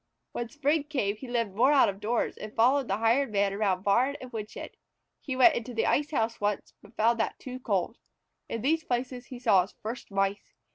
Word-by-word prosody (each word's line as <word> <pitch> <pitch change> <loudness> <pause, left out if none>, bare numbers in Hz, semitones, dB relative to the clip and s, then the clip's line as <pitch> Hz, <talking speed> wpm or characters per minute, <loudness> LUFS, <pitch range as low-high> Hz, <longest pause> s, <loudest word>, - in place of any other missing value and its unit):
When 240 -1 -4
spring 295 +1 0
came 255 -9 -1
he 260 - -9
lived 230 -5 -1
more 250 +7 +4
out 285 -3 +6
of 195 0 -3
doors, 225 +3 -1
and 215 - -9
followed 255 +3 +3
the 195 - 0
Hired 230 +4 +2
Man 200 -1 +1
around 195 -3 0
barn 250 +8 +2
and 255 -1 -10
woodshed. 215 -2 -7 0.5
He 265 - -4
went 265 +6 +6
into 235 -1 -5
the 225 - +1
ice 295 +2 +1
house 230 -6 -1
once, 205 0 -2
but 205 +2 -18
found 230 +2 +3
that 225 - -1
too 255 -1 -8
cold. 210 -1 -1 0.5
In 230 -1 -4
these 320 +4 +2
places 245 0 -3
he 255 - -8
saw 195 -6 +4
his 185 - -8
first 225 +3 -6
Mice. 195 0 -2
235 Hz, 210 wpm, -28 LUFS, 205-260 Hz, 0.5 s, out